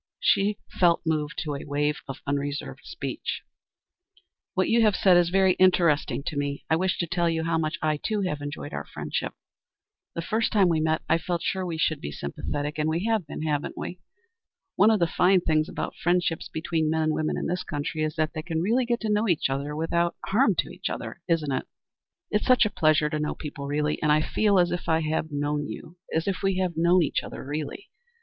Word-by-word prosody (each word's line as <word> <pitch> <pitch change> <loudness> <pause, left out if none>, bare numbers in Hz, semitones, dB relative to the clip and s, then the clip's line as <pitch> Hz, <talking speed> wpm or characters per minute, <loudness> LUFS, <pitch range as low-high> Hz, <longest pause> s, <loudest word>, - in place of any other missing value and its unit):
She 200 +1 +2 0.2
felt 170 -2 +4
moved 155 +1 -1
to 150 -3 -3
a 140 - -5
wave 145 +1 -1
of 135 - -7
unreserved 140 0 -3
speech. - - -4 1.1
"What 185 0 +2
you 230 +1 +4
have 215 -3 +4
said 185 -2 +5
is 175 -1 +4
very 190 0 +4
interesting 160 -8 +3
to 155 - -3
me. 140 0 -2
I - - +6
wish 185 +3 0
to 170 - 0
tell 170 0 +1
you 160 -1 -1
how 165 0 +1
much 155 +1 -1
I, 155 -1 +2
too, 210 +6 -1
have 150 -6 -2
enjoyed 145 0 -6
our - - -3
friendship. - - -3 0.8
The 170 - -3
first 220 +5 0
time 195 -4 +4
we 165 -2 +2
met 160 0 +1
I 165 +1 +3
felt 170 0 -2
sure 190 -1 -1
we 165 -2 -3
should 155 -2 0
be 75 - -5
sympathetic, 145 - -4
and 155 +1 +1
we 165 +5 -1
have 220 -7 +1
been, 150 - -5
haven't 150 -2 -2
we? 180 - -5 0.8
One 210 - +6
of 220 -2 +3
the 170 - +4
fine 180 +3 +3
things 155 -1 +1
about - - -4
friendships 175 -1 0
between 160 -1 -1
men 160 0 +1
and 155 0 +1
women 155 0 -1
in - - -3
this 180 +1 -1
country 150 +1 -3
is 155 0 -1
that 155 -1 0
they 155 - -3
can 160 0 -2
really 235 +8 +1
get 240 0 0
to 220 - -2
know 210 +2 +2
each 155 -5 +1
other 140 +2 -2
without 170 +2 0
er - - -9
harm 215 -1 +4
to 180 - -3
either. - - -6
Isn't 160 -4 +1
it? 130 - -2 0.6
It's 210 - 0
such 250 -2 +6
a 210 - -1
pleasure 155 -1 +3
to 155 - -1
know 150 - -2
people 140 -2 -6
really, 150 +1 -1
and 150 - +3
I 155 +1 +4
feel 205 +2 +2
as 175 -1 +3
if 175 0 -3
I 160 0 +3
had 155 0 -1
known 145 0 -1
you, 175 +2 -9
as 160 +3 0
if 195 -2 0
we 195 -1 +1
had 185 -3 0
known 170 +2 +4
each 145 - 0
other - - -8
really. 150 - -5
165 Hz, 225 wpm, -26 LUFS, 150-185 Hz, 1.1 s, I